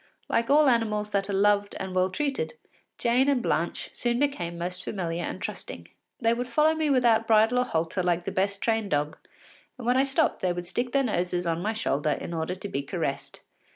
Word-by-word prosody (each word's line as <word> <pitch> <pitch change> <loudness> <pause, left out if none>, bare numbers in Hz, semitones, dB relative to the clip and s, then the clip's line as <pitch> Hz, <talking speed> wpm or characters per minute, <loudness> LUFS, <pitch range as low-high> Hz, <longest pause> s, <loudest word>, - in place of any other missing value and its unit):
Like 230 0 0
all 295 +1 +6
animals 215 -4 +1
that 200 0 0
are - - -1
loved 205 +1 +2
and 190 -1 -4
well 185 0 +2
treated, 285 - -2 0.4
Jane 250 +4 +2
and 275 -3 +3
Blanche 170 -7 -1
soon 240 0 0
became 210 -12 -1
most 180 +1 -4
familiar 175 -3 -3
and - - -4
trusting. - - -7 0.3
They 230 -1 +3
would 245 +1 -3
follow 305 +4 +3
me 315 -1 0
without 235 -4 +3
bridle 225 +3 +4
or 250 - +2
halter 165 -2 -1
like 175 -1 0
the - - -2
best 200 +1 -1
trained 225 -3 0
dog, 150 -2 0 0.6
and 250 - -8
when 245 +1 +3
I 265 - +5
stopped 275 +4 +1
they 180 -1 +1
would 175 0 -5
stick 240 +8 -2
their 275 +1 +2
noses 180 -6 -1
on 165 0 -1
my 215 +4 -1
shoulder 150 -9 -1
in 170 - -6
order 165 +2 -2
to 190 - -7
be 140 -7 -2
caressed. 140 - -4
210 Hz, 210 wpm, -27 LUFS, 180-245 Hz, 0.6 s, all